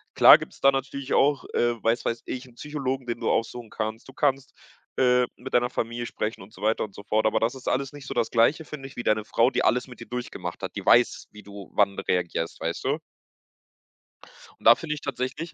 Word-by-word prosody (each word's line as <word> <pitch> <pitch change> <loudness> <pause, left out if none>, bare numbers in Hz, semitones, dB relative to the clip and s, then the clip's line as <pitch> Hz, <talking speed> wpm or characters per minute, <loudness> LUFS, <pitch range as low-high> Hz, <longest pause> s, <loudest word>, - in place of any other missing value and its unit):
Klar - - +9
gibt's - - -10
da 135 - +6
natürlich 135 0 -3
auch, 140 -1 +3
äh 120 -1 +1
weiß 115 +1 +1
weiß 115 - -2
ich, 130 +1 -5
'n 120 - -19
Psychologen, 135 -3 -3
den 120 -1 -3
du - - -1
aufsuchen 115 0 -1
kannst. 110 +1 -4
Du - - -12
kannst, 135 -1 0 0.5
äh, 125 -1 +4
mit 130 +2 -10
deiner 120 0 +3
Familie 120 0 -3
sprechen 110 0 -4
und 95 +3 -13
so 100 - -13
weiter 110 +1 +2
und 100 - -8
so 100 - -10
fort. 110 0 +1
Aber - - +2
das 115 +3 +1
ist 130 -1 -11
alles 135 +2 -1
nicht 145 -3 -10
so 135 - -5
das 115 -2 0
Gleiche, 135 +8 +3
finde 140 -3 -8
ich, 135 - -15
wie 120 - -5
deine 110 0 +1
Frau, 115 +3 +2
die - - 0
alles 125 +2 +2
mit 125 - -13
dir 115 - -10
durchgemacht 125 0 -6
hat. - - -5
Die - - -4
weiß, - - +4
wie 105 -1 -13
du 100 -1 -11
wann 100 -1 +2
reagierst, 85 -2 -2
weißt - - -3
du? - - +1 1.6
Und - - -19
da 115 - +9
finde 150 +2 -4
ich 150 - -9
tatsächlich 140 +5 -4
120 Hz, 230 wpm, -26 LUFS, 110-135 Hz, 1.6 s, Klar